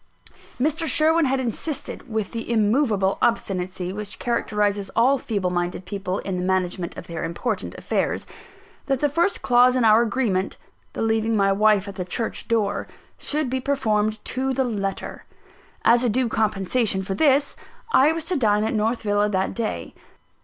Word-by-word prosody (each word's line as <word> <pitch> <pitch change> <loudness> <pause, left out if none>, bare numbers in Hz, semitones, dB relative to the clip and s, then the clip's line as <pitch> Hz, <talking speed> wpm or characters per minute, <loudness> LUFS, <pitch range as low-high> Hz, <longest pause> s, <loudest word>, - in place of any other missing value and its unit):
Mr. 315 +5 0
Sherwin 320 +1 +3
had 270 0 +1
insisted, 260 +1 -4
with 220 -3 -2
the 230 0 -4
immovable 215 -3 +2
obstinacy 185 -5 -1
which 210 0 -6
characterises 210 -4 -1
all 260 +4 +4
feeble 200 -5 -2
minded 175 +1 -2
people 195 -2 -3
in 190 -2 -3
the 180 - -2
management 185 -1 -1
of - - -7
their 170 - -5
important 185 +6 -3
affairs, - - -1 0.6
that 270 -2 +1
the 295 - +2
first 340 +6 0
clause 250 0 +5
in 250 -3 +2
our 220 +1 +6
agreement 215 -5 0 0.4
(the - - -2
leaving 225 0 +1
my 195 -1 +3
wife 205 0 +3
at 200 - -8
the 185 - -2
church 220 +5 -3
door) 210 -3 0 0.3
should 300 -1 -1
be 260 +1 -1
performed 215 -6 0
to 265 +1 -1
the 265 - +2
letter. 200 -5 -4 0.6
As 240 +1 +5
a 245 - +2
due 250 +3 +1
compensation 215 -1 0
for 195 0 -3
this, 280 +5 +3 0.4
I 285 -2 +5
was 325 -1 -4
to 360 - 0
dine 210 -6 +2
at 220 - -1
North 225 +2 0
Villa 205 0 +2
that 190 -1 0
day. 150 - -4
220 Hz, 165 wpm, -23 LUFS, 195-255 Hz, 0.6 s, our